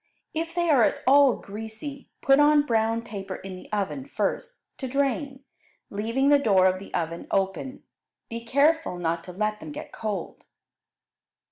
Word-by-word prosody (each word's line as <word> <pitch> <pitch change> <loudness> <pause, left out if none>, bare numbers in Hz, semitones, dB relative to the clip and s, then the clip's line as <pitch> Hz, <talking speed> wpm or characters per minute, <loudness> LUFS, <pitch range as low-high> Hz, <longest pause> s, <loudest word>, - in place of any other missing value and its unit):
If 330 +1 -3
they 345 -1 +1
are 270 -5 +5
at - - +2
all 275 -1 +6
greasy, 220 +7 -8
put 275 0 +5
on 295 0 +5
brown 225 -2 +1
paper 195 -4 -6
in 190 -1 -8
the 185 - -13
oven 210 +6 -2
first, - - -3 0.2
to 265 - -3
drain, 275 +1 -1 0.5
leaving 230 +7 +1
the 290 -1 +6
door 195 -8 +4
of 185 0 +3
the 195 - -11
oven 165 0 -3
open. 195 +8 -1 0.4
Be 230 -1 -6
careful 285 - +2
not 165 -1 -1
to 180 - -8
let 210 +3 -1
them - - -8
get 300 +1 -8
cold. 210 -5 -5
230 Hz, 160 wpm, -26 LUFS, 195-285 Hz, 0.5 s, all